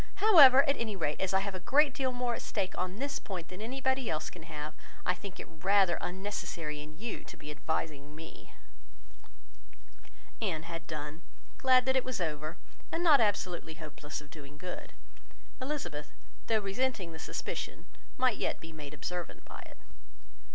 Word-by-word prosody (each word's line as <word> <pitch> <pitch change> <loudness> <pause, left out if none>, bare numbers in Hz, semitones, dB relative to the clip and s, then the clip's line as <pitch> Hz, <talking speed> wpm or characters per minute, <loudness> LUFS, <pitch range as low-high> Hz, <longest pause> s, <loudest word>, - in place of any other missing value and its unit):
However, 295 -11 +9
at 280 - +3
any 220 -3 -2
rate, 150 -5 -1
as 190 - +1
I 190 0 +4
have 200 0 -2
a 185 - -4
great 280 +9 +4
deal 260 -1 0
more 245 -1 0
at - - -3
stake 195 -3 -2
on 180 +1 -2
this 275 +4 -2
point 180 -4 -5
than 185 +2 -8
anybody 265 +2 0
else 155 -1 -1
can 175 - -10
have, 150 0 -5 0.3
I 180 - +4
think 195 +1 -8
it - - -5
rather 190 +3 +3
unnecessary 180 -5 -3
in 155 +1 -10
you 225 +4 -4
to - - -11
be 150 - -7
advising 150 -1 -3
me." 160 +1 -11 1.9
Anne 170 -8 0
had 165 -1 -6
done; 155 +1 -5 0.4
glad 255 -1 +6
that 260 0 +3
it 260 - +4
was 255 -4 -3
over, 155 -1 -2 0.3
and 335 - 0
not 300 -6 +7
absolutely 180 -6 0
hopeless 150 -1 -6
of 145 0 -15
doing 145 -2 -11
good. 180 +3 -6 0.7
Elizabeth, 215 - -3 0.4
though 220 -1 +4
resenting 200 -2 -1
the 160 - -8
suspicion, - - -4 0.3
might 255 -4 +3
yet - - -1
be 160 0 -10
made 150 -1 -7
observant 175 +4 -5
by - - -9
it. - - -15
185 Hz, 170 wpm, -32 LUFS, 155-250 Hz, 1.9 s, However